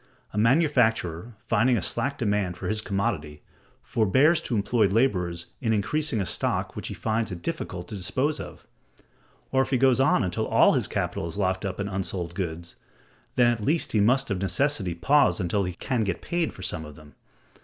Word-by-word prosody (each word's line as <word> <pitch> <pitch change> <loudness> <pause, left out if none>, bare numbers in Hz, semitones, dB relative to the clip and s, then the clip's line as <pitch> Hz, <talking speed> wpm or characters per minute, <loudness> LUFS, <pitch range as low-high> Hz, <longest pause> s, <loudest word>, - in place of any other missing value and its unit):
A - - -5
manufacturer, 115 - +2
finding 115 +3 +2
a - - -1
slack 140 +1 -1
demand 105 -7 -1
for - - -5
his 110 0 -1
commodity, 75 -8 -3 0.4
forbears 135 - +3
to 125 - -3
employ 105 +1 +2
laborers 90 -6 0 0.2
in 110 -3 +1
increasing 115 +5 0
a 95 - 0
stock - - -1
which - - -4
he - - -5
finds 110 -1 -1
it 85 -1 -7
difficult 90 +1 -4
to - - -6
dispose 130 +11 -1
of; - - -9 0.9
or 130 - +3
if - - -1
he 130 - +2
goes 130 0 +4
on 135 -3 +3
until 90 -2 -2
all - - +5
his - - 0
capital - - -2
is 85 - -6
locked 95 0 0
up 95 0 -4
in 100 - -2
unsold 95 -3 -3
goods, 85 -2 -5 0.6
then 120 -1 +4
at 115 - -6
least 155 +10 0
he 110 - +2
must 125 +3 +2
of 95 -1 -1
necessity 95 - 0
pause 140 +12 +3
until 95 +2 0
he 90 - -4
can 125 +3 -1
get 95 -4 -2
paid 170 -2 -1
for 95 - -11
some 80 -3 -2
of 75 -1 -10
them. 75 0 -16
105 Hz, 195 wpm, -26 LUFS, 90-130 Hz, 0.9 s, all